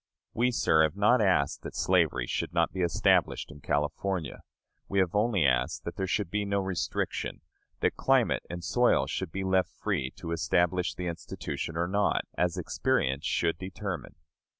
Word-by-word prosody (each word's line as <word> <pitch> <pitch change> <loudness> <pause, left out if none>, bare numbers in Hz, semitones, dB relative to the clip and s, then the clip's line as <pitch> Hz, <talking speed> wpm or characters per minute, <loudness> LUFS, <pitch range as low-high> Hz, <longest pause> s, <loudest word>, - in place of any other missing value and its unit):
We, 120 +2 +2
sir, 80 -9 +3
have 80 +2 +2
not 105 +4 +4
asked 90 -9 +2
that - - -8
slavery - - +2
should - - -3 0.2
be 95 - -3
established 85 -3 +2
in 75 -1 -13
California. 80 +4 -2 0.5
We 100 - -1
have 95 -3 +2
only 105 -5 +2
asked 65 -3 +1
that 85 - -5
there 95 -1 -2
should 95 -1 -1
be 105 0 0
no 100 0 0
restriction; 95 -3 -2 0.4
that - - +1
climate - - +3
and 85 0 -6
soil - - +3
should 95 -4 -4
be 95 +2 -3
left 95 -1 +2
free 85 -12 -2
to 85 - -6
establish 85 +2 +1
the 90 - -5
institution 85 -1 -5
or 85 +1 +1
not, 100 +3 +1
as 90 -1 0
experience 65 +5 0
should 85 -1 0
determine. 95 -1 -5
90 Hz, 165 wpm, -29 LUFS, 80-100 Hz, 0.5 s, not